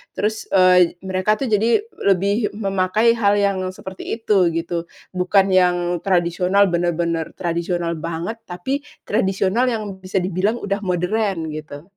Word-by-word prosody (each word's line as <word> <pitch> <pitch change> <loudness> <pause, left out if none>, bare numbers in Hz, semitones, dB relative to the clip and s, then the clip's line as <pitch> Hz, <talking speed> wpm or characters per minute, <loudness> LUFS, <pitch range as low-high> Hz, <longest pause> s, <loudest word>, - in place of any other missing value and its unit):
Terus, 215 +1 -2
eee, 180 -2 +4
mereka 190 +3 +1
tuh 255 0 -3
jadi 225 - +3 0.2
lebih 200 +3 +1
memakai 200 +2 +2
hal 205 -1 +3
yang 200 -2 0
seperti 190 0 -6
itu, 210 -5 +2
gitu. 170 0 -3 0.2
Bukan 190 +1 +2
yang 175 -1 +2
tradisional 180 +2 +2
bener-bener 170 -1 -1
tradisional 170 -1 -2
banget, 170 +7 -4
tapi 180 +11 -3 0.2
tradisional 200 +3 +1
yang 210 -5 -3
bisa 185 0 -2
dibilang 190 +5 0
udah 200 -3 -3
modern, 180 -2 -1
gitu. 150 -1 -8
185 Hz, 130 wpm, -20 LUFS, 175-205 Hz, 0.2 s, eee